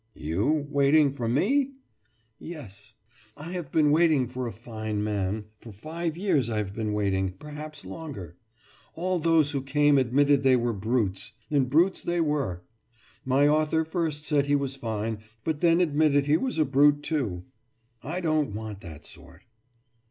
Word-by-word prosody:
« 115 Hz, -, -45 dB
»You 105 Hz, -, 0 dB
waiting 140 Hz, 0 st, +4 dB
for 120 Hz, -4 st, -3 dB
me?« 265 Hz, -, +2 dB, 0.7 s
»Yes, 110 Hz, -, -10 dB, 0.4 s
I 155 Hz, +4 st, -8 dB
have 175 Hz, -6 st, -5 dB
been 150 Hz, -2 st, +3 dB
waiting 155 Hz, -5 st, +3 dB
for 125 Hz, 0 st, -4 dB
a -, -, -4 dB
fine 110 Hz, -2 st, -5 dB
man. 105 Hz, 0 st, -2 dB
For 115 Hz, -, -11 dB
five 160 Hz, -, -5 dB
years 170 Hz, -, +1 dB
I 110 Hz, -, -2 dB
have 100 Hz, -2 st, -3 dB
been 110 Hz, -1 st, -2 dB
waiting 95 Hz, -2 st, 0 dB
perhaps 150 Hz, +6 st, -9 dB
longer. 130 Hz, -, -8 dB, 0.6 s
All 180 Hz, +2 st, -1 dB
those 160 Hz, -2 st, +3 dB
who 140 Hz, -3 st, -2 dB
came 145 Hz, +1 st, +3 dB
admitted 140 Hz, +3 st, +3 dB
they 130 Hz, -1 st, +5 dB
were 120 Hz, -1 st, 0 dB
brutes 105 Hz, -2 st, -1 dB, 0.2 s
and 135 Hz, -4 st, +2 dB
brutes 170 Hz, +7 st, +3 dB
they 175 Hz, 0 st, -1 dB
were. 145 Hz, -, -1 dB, 0.6 s
My 135 Hz, +2 st, +3 dB
author 155 Hz, +1 st, +2 dB
first 160 Hz, -3 st, -2 dB
said 145 Hz, -2 st, +1 dB
he 145 Hz, -, +3 dB
was 140 Hz, -1 st, -1 dB
fine, 110 Hz, -3 st, -3 dB, 0.2 s
but 155 Hz, -2 st, -2 dB
then 170 Hz, 0 st, +4 dB
admitted 150 Hz, -4 st, +3 dB
he 145 Hz, +1 st, +3 dB
was 255 Hz, +7 st, -1 dB
a 155 Hz, -, +3 dB
brute, 145 Hz, +2 st, +4 dB
too. 120 Hz, -, -2 dB, 0.6 s
I 180 Hz, -, -4 dB
don't 155 Hz, -, 0 dB
want 110 Hz, -2 st, -6 dB
that 80 Hz, -7 st, -11 dB
sort. -, -, -12 dB
140 Hz, 165 wpm, -27 LUFS, 110-155 Hz, 0.7 s, they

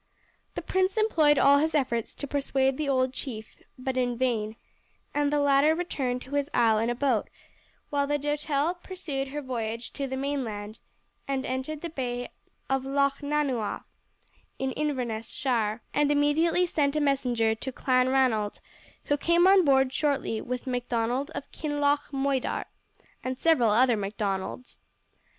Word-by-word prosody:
The -, -, -4 dB
prince 375 Hz, +2 st, 0 dB
employed 320 Hz, -10 st, +4 dB
all 280 Hz, +1 st, +6 dB
his 315 Hz, +2 st, 0 dB
efforts 235 Hz, -6 st, 0 dB
to -, -, -5 dB
persuade 270 Hz, -1 st, +1 dB
the 295 Hz, 0 st, -2 dB
old 260 Hz, -1 st, +2 dB
chief, 225 Hz, -6 st, -7 dB, 0.2 s
but 255 Hz, 0 st, -3 dB
in 245 Hz, -2 st, 0 dB
vain, 225 Hz, -4 st, 0 dB, 0.6 s
and 290 Hz, 0 st, +1 dB
the 295 Hz, -, +2 dB
latter 285 Hz, +2 st, +4 dB
returned 260 Hz, -8 st, -2 dB
to 265 Hz, -, -12 dB
his 285 Hz, 0 st, 0 dB
isle 225 Hz, -3 st, +4 dB
in 225 Hz, +2 st, 0 dB
a 240 Hz, -, 0 dB
boat, 255 Hz, -4 st, +1 dB, 0.6 s
while 285 Hz, -1 st, +1 dB
the 290 Hz, 0 st, +1 dB
Doutelle 295 Hz, +2 st, 0 dB
pursued 295 Hz, -8 st, -4 dB
her 290 Hz, +2 st, -5 dB
voyage 230 Hz, -2 st, -4 dB
to 275 Hz, -, -3 dB
the 265 Hz, 0 st, -4 dB
mainland 230 Hz, -7 st, -3 dB, 0.5 s
and 270 Hz, -1 st, -1 dB
entered 265 Hz, +4 st, -3 dB
the 340 Hz, -, -4 dB
Bay 245 Hz, -4 st, -4 dB, 0.4 s
of 270 Hz, 0 st, +1 dB
Lochnanuagh, 280 Hz, -3 st, 0 dB, 0.7 s
in 265 Hz, 0 st, -1 dB
Inverness 250 Hz, -7 st, -2 dB
shire, 230 Hz, -4 st, -1 dB
and 290 Hz, 0 st, +2 dB
immediately 315 Hz, +5 st, +3 dB
sent 295 Hz, -4 st, 0 dB
a -, -, +2 dB
messenger 250 Hz, -6 st, +1 dB
to 255 Hz, +4 st, -5 dB
Clanranald, 255 Hz, -5 st, +2 dB, 0.4 s
who 290 Hz, -, +1 dB
came 340 Hz, +4 st, +3 dB
on 380 Hz, 0 st, +7 dB
board 265 Hz, -3 st, +3 dB
shortly 280 Hz, -7 st, 0 dB
with 250 Hz, +1 st, -4 dB
Macdonald 245 Hz, +1 st, -1 dB
of -, -, -6 dB
Kinloch 290 Hz, -1 st, 0 dB
Moidart, 270 Hz, -1 st, -1 dB, 0.6 s
and 255 Hz, 0 st, -3 dB
several 290 Hz, -9 st, +3 dB
other 240 Hz, +3 st, +4 dB
Macdonalds. 200 Hz, +2 st, -4 dB
270 Hz, 150 wpm, -27 LUFS, 245-290 Hz, 0.7 s, on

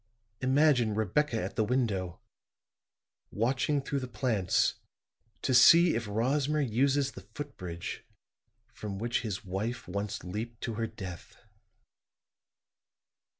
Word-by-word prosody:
Imagine 130 Hz, -4 st, +3 dB
Rebecca 115 Hz, +4 st, +1 dB
at -, -, -4 dB
the 110 Hz, -, +2 dB
window, 105 Hz, -7 st, -1 dB, 1.1 s
watching 130 Hz, +5 st, 0 dB
through 140 Hz, 0 st, -2 dB
the 130 Hz, -, -5 dB
plants 115 Hz, -7 st, +1 dB, 0.6 s
to 130 Hz, -, +1 dB
see 165 Hz, +8 st, +8 dB
if 115 Hz, -2 st, -2 dB
Rosmer 135 Hz, +8 st, +1 dB
uses 140 Hz, +2 st, +2 dB
the -, -, -10 dB
footbridge 90 Hz, -13 st, -6 dB, 0.7 s
from 105 Hz, -4 st, -6 dB
which 120 Hz, +3 st, -1 dB
his 105 Hz, -3 st, -4 dB
wife 105 Hz, +6 st, -3 dB
once 100 Hz, +1 st, -4 dB
leaped 110 Hz, +6 st, -5 dB
to 115 Hz, -, -3 dB
her 115 Hz, +1 st, -2 dB
death." 90 Hz, -5 st, -9 dB
115 Hz, 110 wpm, -30 LUFS, 105-135 Hz, 1.1 s, see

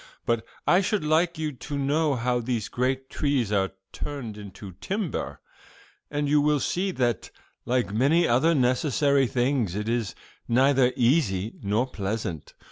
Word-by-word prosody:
But 115 Hz, -1 st, +1 dB, 0.2 s
I 180 Hz, -, +5 dB
should 200 Hz, -2 st, 0 dB
like 165 Hz, +2 st, +2 dB
you 155 Hz, -1 st, -2 dB
to 145 Hz, +2 st, -6 dB
know 145 Hz, +1 st, +1 dB
how 125 Hz, +1 st, 0 dB
these 120 Hz, -3 st, -2 dB
great 130 Hz, +1 st, -1 dB
trees 135 Hz, -9 st, 0 dB
are 95 Hz, -2 st, +1 dB, 0.2 s
turned 130 Hz, -7 st, -6 dB
into 100 Hz, -1 st, -9 dB
timber, 200 Hz, -3 st, -3 dB, 0.7 s
and 145 Hz, 0 st, -1 dB
you 145 Hz, +1 st, +4 dB
will 150 Hz, 0 st, +2 dB
see 185 Hz, +7 st, -1 dB
that, 125 Hz, -, -1 dB, 0.4 s
like 125 Hz, -4 st, 0 dB
many 145 Hz, +9 st, +3 dB
other 150 Hz, +8 st, +3 dB
necessary 135 Hz, +1 st, +2 dB
things, 120 Hz, -6 st, 0 dB
it 105 Hz, +1 st, -3 dB
is 115 Hz, -3 st, -1 dB, 0.3 s
neither 130 Hz, +1 st, +4 dB
easy 115 Hz, -, +1 dB
nor 105 Hz, +5 st, +1 dB
pleasant. 100 Hz, -, -4 dB
130 Hz, 145 wpm, -26 LUFS, 115-150 Hz, 0.7 s, I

